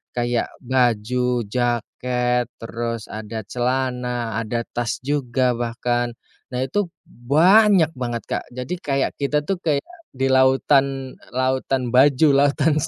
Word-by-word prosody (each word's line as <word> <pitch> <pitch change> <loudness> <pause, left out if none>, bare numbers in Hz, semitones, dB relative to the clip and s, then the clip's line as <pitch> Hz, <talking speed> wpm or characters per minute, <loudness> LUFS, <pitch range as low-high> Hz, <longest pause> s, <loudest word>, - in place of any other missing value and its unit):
kayak 120 -1 0 0.2
baju, 125 0 +1
jaket, 125 +1 -1 0.2
terus 115 -1 -4
ada 110 0 -6
celana, 125 -2 -1
ada 115 +1 -2
tas 115 -3 -2
juga 130 -3 0
bahkan. 120 0 -1 0.4
Nah 125 +1 0
itu 190 +8 -1 0.2
banyak 170 - +4
banget, 120 -2 -3
Kak. - - -2
Jadi 125 +8 -4
kayak 140 -4 0
kita 150 +1 0
tuh 190 +4 -2
kayak 150 -5 0 0.3
di 135 +1 0
lautan 135 0 +2 0.2
lautan 130 -1 0
baju, 140 +3 +5
lautan 145 +2 +3
125 Hz, 115 wpm, -22 LUFS, 120-140 Hz, 0.4 s, baju